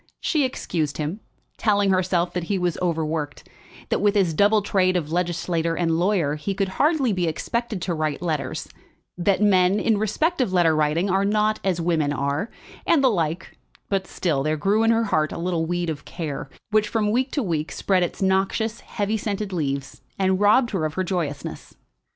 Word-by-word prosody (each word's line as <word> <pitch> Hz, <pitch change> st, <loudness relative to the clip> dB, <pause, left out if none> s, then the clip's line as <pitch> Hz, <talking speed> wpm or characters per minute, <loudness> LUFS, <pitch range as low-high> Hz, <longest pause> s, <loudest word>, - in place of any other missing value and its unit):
She 300 Hz, -5 st, +1 dB
excused 160 Hz, -, -2 dB
him, 155 Hz, +7 st, -3 dB, 0.4 s
telling 205 Hz, -2 st, +3 dB
herself 180 Hz, -1 st, +1 dB
that 175 Hz, -2 st, -2 dB
he 200 Hz, +2 st, 0 dB
was 180 Hz, -2 st, 0 dB
overworked, 160 Hz, -4 st, -2 dB, 0.4 s
that -, -, 0 dB
with 205 Hz, 0 st, +3 dB
his 185 Hz, -5 st, +2 dB
double 205 Hz, +5 st, +3 dB
trade 185 Hz, -2 st, +2 dB
of 155 Hz, -3 st, -4 dB
legislator 170 Hz, -1 st, -1 dB
and 165 Hz, -1 st, 0 dB
lawyer 175 Hz, -6 st, +1 dB
he 195 Hz, +6 st, -3 dB
could 195 Hz, -1 st, 0 dB
hardly 275 Hz, -, +2 dB
be 180 Hz, -2 st, 0 dB
expected 220 Hz, +5 st, -2 dB
to 180 Hz, -, -1 dB
write 155 Hz, -2 st, -1 dB
letters, 155 Hz, -2 st, -3 dB, 0.5 s
that 190 Hz, +3 st, +1 dB
men, 190 Hz, -1 st, +4 dB
in 220 Hz, -3 st, +2 dB
respect 280 Hz, -, 0 dB
of 240 Hz, -, 0 dB
letter 175 Hz, -3 st, +3 dB
writing, 155 Hz, +4 st, +1 dB
are 195 Hz, +1 st, +2 dB
not 215 Hz, +1 st, +1 dB
as 185 Hz, -3 st, 0 dB
women 165 Hz, -4 st, +1 dB
are, 145 Hz, +9 st, -1 dB, 0.4 s
and 300 Hz, -5 st, +4 dB
the 260 Hz, -, +5 dB
like; 165 Hz, -3 st, -2 dB, 0.3 s
but 195 Hz, -1 st, -1 dB
still 155 Hz, -7 st, -1 dB
there 155 Hz, +2 st, 0 dB
grew 200 Hz, +8 st, +2 dB
at 225 Hz, -, +3 dB
her 230 Hz, 0 st, +3 dB
heart 155 Hz, -8 st, +1 dB
a -, -, -5 dB
little 170 Hz, -1 st, -1 dB
weed 175 Hz, 0 st, -1 dB
of 155 Hz, -3 st, -4 dB
care, 145 Hz, -5 st, -5 dB, 0.2 s
which 215 Hz, 0 st, +3 dB
from 210 Hz, -1 st, 0 dB
week 255 Hz, +4 st, +1 dB
to 285 Hz, -, 0 dB
week 160 Hz, -5 st, -2 dB
spread 190 Hz, -2 st, +1 dB
its 175 Hz, +2 st, -2 dB
noxious, 195 Hz, +4 st, +1 dB
heavy 210 Hz, +1 st, -2 dB
scented 205 Hz, -2 st, -3 dB
leaves, 140 Hz, -5 st, -3 dB, 0.2 s
and 190 Hz, -1 st, +1 dB
robbed 215 Hz, +4 st, +4 dB
her 190 Hz, -6 st, -1 dB
of 155 Hz, 0 st, -2 dB
her 185 Hz, -, 0 dB
joyousness. 165 Hz, -6 st, -4 dB
185 Hz, 190 wpm, -23 LUFS, 160-210 Hz, 0.5 s, the